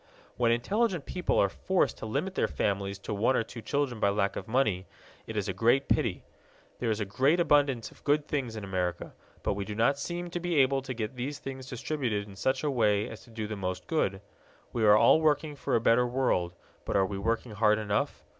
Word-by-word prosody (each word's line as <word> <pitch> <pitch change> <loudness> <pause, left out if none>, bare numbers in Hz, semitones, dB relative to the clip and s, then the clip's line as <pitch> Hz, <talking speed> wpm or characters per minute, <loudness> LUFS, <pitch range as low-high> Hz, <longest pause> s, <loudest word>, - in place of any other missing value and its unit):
When 120 -1 +2
intelligent 185 - 0
people 180 -1 -1
are 100 - +5
forced 185 - 0
to - - -5
limit 150 - -2
their - - +1
families 100 0 -1
to 100 - -5
one 115 +6 +2
or 115 - +2
two 115 +1 -9
children 140 -3 -1
by 100 - +3
lack 100 -1 0
of 100 - -5
money, 110 -6 +1 0.4
it - - -5
is - - -1
a - - -1
great 120 +4 +2
pity. - - 0 0.6
There 120 - -1
is 110 -1 0
a 105 - -1
great 135 - +2
abundance 145 -7 +2
of - - -20
good 145 +1 +2
things 130 -6 -2
in 110 - -6
America, 90 -3 -3 0.3
but - - +1
we 100 0 -3
do 105 +1 -6
not 130 +6 +2
seem 175 +3 -4
to 175 - -2
be 175 -1 -2
able 135 -1 +3
to 130 -1 -6
get 115 +2 -4
these 140 +4 -3
things 130 -1 -7
distributed 125 -5 -2
in 100 - -12
such 130 +8 0
a 150 - +1
way 105 -5 +2
as 110 - -9
to - - -19
do 110 -1 -5
the 105 +1 -4
most 95 -2 -4
good. 100 - 0 0.5
We 115 - 0
are 105 0 +7
all 160 - +6
working 150 -1 +1
for - - -1
a - - +4
better 115 +2 +3
world, 120 -9 0 0.3
but - - -3
are 95 -1 +4
we 95 0 -4
working 115 +3 -1
hard 105 0 +3
enough? 105 -2 -1
115 Hz, 230 wpm, -29 LUFS, 105-140 Hz, 0.6 s, are